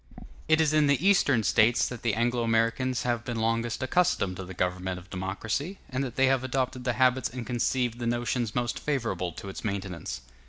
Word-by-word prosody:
It 155 +1 +4
is 155 -1 +3
in 155 -1 +4
the 140 +6 +2
Eastern 145 - +4
States 110 +4 +4
that 125 -2 -7
the 115 -4 0
Anglo 120 +1 +1
Americans 115 +3 +1
have 120 -1 -1
been 120 -2 -3
longest 115 +2 0
accustomed 130 - +1
to 95 - -5
the 95 0 -9
government 90 +1 -1
of 90 +2 -13
democracy, 105 - -3
and 130 +1 -1
that 125 -3 -5
they 135 - +4
have 130 -1 +2
adopted 130 0 -2
the 125 - +1
habits 130 0 +2
and 125 0 -6
conceived 120 0 0
the 120 - -2
notions 120 -1 -1
most 120 -1 -1
favorable 120 -11 -2
to 100 - -9
its 95 - -7
maintenance. 95 -5 -4
120 Hz, 200 wpm, -28 LUFS, 110-130 Hz, -, It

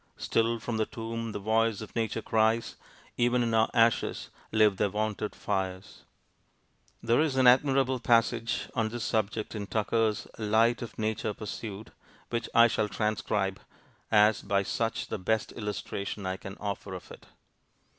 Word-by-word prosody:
Still 115 +1 +1
from 115 0 -4
the 110 - 0
tomb 115 0 -5
the - - -4
voice 110 +1 +1
of 110 - -9
nature 115 -1 -1
cries; 110 +1 +1 0.4
Even 120 0 +3
in 115 -1 -1
our 110 0 +3
ashes 115 -1 +2 0.2
live 110 -3 +4
their 100 - +1
wonted 105 +1 -2
fires! 95 -2 -4 1.0
There 115 +4 +3
is 155 -4 +1
an 130 -1 +3
admirable 130 0 +4
passage 115 -1 +1
on 110 -1 0
this 120 +1 -5
subject 110 0 -1
in 105 -2 -5
Tucker's 110 0 0
Light 110 +2 +2
of 115 -3 -7
Nature 110 -1 -2
Pursued, 105 -1 -7 0.4
which 115 -1 -2
I 115 0 +8
shall 110 -2 0
transcribe, 105 -2 -1 0.5
as 105 -1 +5
by 100 -1 0
much 115 -1 -1
the - - -3
best 110 +3 0
illustration 105 -2 -5
I 95 0 -2
can 95 0 -9
offer 100 -2 -5
of 90 - -10
it. - - -13
110 Hz, 155 wpm, -29 LUFS, 105-115 Hz, 1.0 s, I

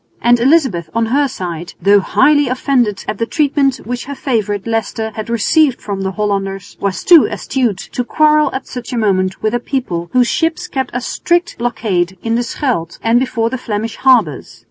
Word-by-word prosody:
And 240 0 +3
Elizabeth 245 - +2
on 230 0 +2
her 285 0 +3
side, 175 -8 -6
though 200 +3 +5
highly 290 +8 +3
offended 250 -5 0
at 215 - -4
the 230 - -1
treatment 280 -3 +1
which 245 +2 -4
her 280 +1 -6
favourite, 210 -7 -2
Leicester, 225 -1 -2
had 215 +1 -6
received 250 +4 +2
from 200 -2 -5
the 190 0 -2
Hollanders, 195 -2 -3
was 200 -1 -2
too 340 -5 +7
astute 245 -8 -1
to 250 - -2
quarrel 305 +3 +3
at 265 - -5
such 250 -2 -7
a 245 - -2
moment 190 -3 0
with 215 +1 +1
a 240 - +1
people 180 -10 -3
whose 250 -1 +3
ships 330 +5 -1
kept 265 -2 -3
a 245 - -1
strict 345 +7 -1
blockade 190 -6 -1
in 225 - -1
the 235 - +1
Scheldt 235 - -2
and 230 +1 +3
before 230 -3 -1
the 260 - -3
Flemish 220 0 -4
harbours. 235 - +2
235 Hz, 190 wpm, -16 LUFS, 200-265 Hz, -, too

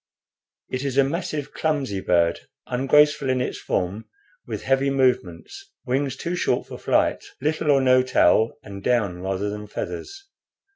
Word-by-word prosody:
It 130 +1 -2
is 135 -1 -2
a 140 - +6
massive, 150 0 -3
clumsy 140 -11 -1
bird, 85 -2 +2 0.3
ungraceful 150 +2 +3
in 130 0 +1
its 125 - -3
form 95 +5 -2 0.4
with - - -5
heavy 135 +1 +2
movements, 130 - -1 0.2
wings 135 +1 -1
too 175 +1 -3
short - - 0
for - - -9
flight, - - +1 0.2
little 155 +2 -1
or 140 -2 +5
no 130 -1 +5
tail, 115 -3 +3
and 100 -2 -9
down 105 -8 +1
rather 95 +2 -2
than 105 0 -7
feathers. 390 - -6
130 Hz, 150 wpm, -23 LUFS, 105-145 Hz, 0.4 s, a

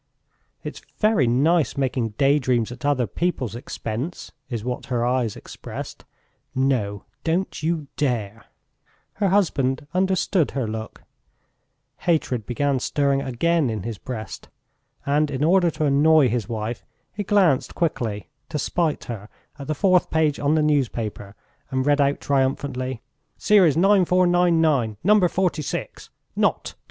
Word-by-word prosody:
"It's - - -7 0.2
very 210 - +3
nice 145 +6 +2
making 125 -5 -1
daydreams 130 -5 +2
at 120 0 -10
other 135 -4 +2
people's 125 - -2
expense!" 120 +5 -5 0.2
is 115 -4 -4
what 125 +1 -4
her 120 -2 0
eyes 125 -3 0
expressed. - - -9 0.5
"No, 120 -7 0 0.2
don't 170 +2 -1
you 160 -1 -1
dare!" 115 -6 -2 0.8
Her 200 - +3
husband 150 -8 +1
understood 185 - +1
her 130 -4 -1
look; 110 0 -6 1.0
hatred 130 - 0
began 140 +2 0
stirring 140 +1 +1
again 145 +3 +1
in 110 -4 -3
his 115 -3 -5
breast, 110 -6 -7 0.6
and 150 +2 +2
in 140 0 -2
order 175 +2 +4
to 155 -1 -2
annoy 145 0 +5
his 115 -3 -2
wife 110 +1 -4 0.3
he 210 - -4
glanced 185 -9 +2
quickly, 115 -11 -2 0.2
to 155 - -3
spite 160 +2 -1
her 105 -3 -7 0.3
at 140 - -7
the 155 - -1
fourth 185 +2 +3
page 155 -2 +1
on 145 +2 +2
the 155 - +2
newspaper 115 -8 -1 0.3
and 130 -1 -1
read 145 0 +3
out 140 0 +1
triumphantly: 130 -2 -1 0.3
"Series 190 -8 +4
9,499, 175 - +3
number 205 0 +5
46! 175 -5 -3 0.3
Not - - +1
26!" - - -8
140 Hz, 135 wpm, -23 LUFS, 120-165 Hz, 1.0 s, annoy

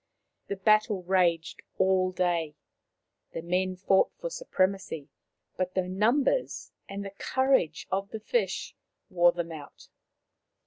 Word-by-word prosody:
The 200 - -2
battle 210 -1 +3
raged 175 -3 +1 0.2
all 185 -1 +3
day. 170 -4 0 0.8
The 165 - -5
men 185 +2 0
fought 190 +1 +3
for - - -5
supremacy, 190 - -1 0.5
but 185 0 -2
the 185 -1 0
numbers 235 - +1 0.2
and 200 0 -5
the 195 - -6
courage 260 - +1
of 195 +1 -1
the 220 - -6
fish 475 - -1 0.4
wore 175 -1 +5
them 170 -1 -4
out. 150 -3 -11
185 Hz, 125 wpm, -28 LUFS, 175-200 Hz, 0.8 s, wore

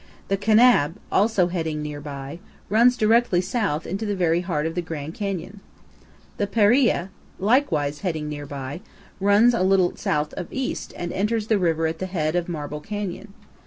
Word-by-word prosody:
The 195 - +2
Kanab, 215 -6 +4 0.2
also 200 -3 +3
heading 160 -4 -2
near 150 -1 -6
by, 140 +2 -7 0.3
runs 240 +4 +4
directly 225 -4 +3
south 185 - -1
into 195 +5 -4
the 205 -2 -1
very 175 -2 +2
heart 165 -4 -2
of 165 - -2
the 175 - -1
Grand 160 -2 -6
Canyon. 195 0 -4 0.8
The 205 - 0
Paria, 210 -2 +3 0.3
likewise 195 - +1
heading 160 -6 -3
near 145 -1 -6
by, 140 +3 -6 0.4
runs 205 +5 +5
a 230 - 0
little 185 -1 +3
south 150 0 -1
of 180 - -5
east 265 -1 -4
and 175 0 -4
enters 215 +2 -1
the 215 -3 +3
river 165 -3 +1
at 160 0 -2
the 185 - -3
head 160 -3 -1
of 175 0 -1
Marble 150 -2 -5
Canyon. 205 +1 -5
180 Hz, 170 wpm, -23 LUFS, 155-210 Hz, 0.8 s, runs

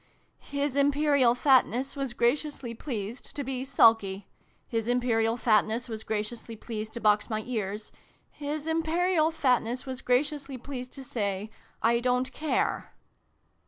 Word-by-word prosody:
" - - -42 0.2
His 280 -1 0
Imperial 280 -3 +4
Fatness 260 0 +3
was 270 -3 -3
graciously 245 0 0
pleased 230 -2 -6
to 285 - -2
be 260 -1 -3
sulky. 225 -7 +3 0.4
His 225 -1 -2
Imperial 235 -2 +2
Fatness 225 +1 +2
was 220 -2 -6
gra 215 -1 -1
ciously 225 0 -8
pleased 220 -2 -5
to 235 - -5
box 210 -1 +3
my 215 -1 -2
ears. 210 -3 -3 0.4
His 295 +1 -4
Imperial 325 +1 +2
Fatness 255 -5 +1
was 260 -1 -5
graciously 275 +1 0
pleased 255 0 -7
to 270 - -8
say 205 -4 -3 0.2
' - - -28
I 235 +1 +4
don't 250 +1 0
care 310 -1 -1
250 Hz, 145 wpm, -28 LUFS, 225-280 Hz, 0.4 s, Imperial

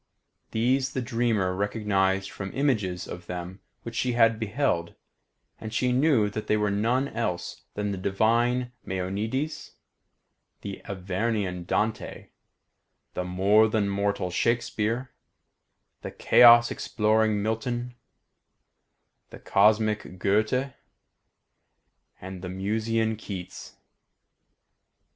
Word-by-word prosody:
These 130 +4 +1
the 130 - -1
dreamer 115 -6 0
recognised 95 -1 0
from 95 -1 -6
images 105 -11 0
of 90 0 -8
them 90 +2 -6 0.2
which 115 - -7
she 125 +1 0
had 115 -2 +4
beheld, 110 -6 -1 0.6
and 110 - -7
she 125 +2 +1
knew 130 -4 +3
that 110 +1 -5
they 105 - +2
were 105 -1 0
none 120 +7 +1
else 90 -7 -4
than 105 0 -2
the 95 - -4
divine 120 +6 +1
Maeonides, 105 +11 -3 0.9
the 100 -1 -7
Avernian 95 -1 -2
Dante, 110 +4 -2 0.8
the 90 - -2
more 100 +5 +3
than 105 -2 0
mortal 100 -2 -1
Shakespeare, 115 +3 -1 0.9
the - - -5
chaos 120 -1 +6
exploring 110 -1 +1
Milton, 120 +3 -2 1.4
the - - -11
cosmic 105 -2 +2
Goethe, 110 +8 +1 1.5
and 95 -1 -8
the 90 - -6
Musaean 110 +4 -1
Keats. 95 -4 -8
110 Hz, 105 wpm, -26 LUFS, 95-120 Hz, 1.5 s, chaos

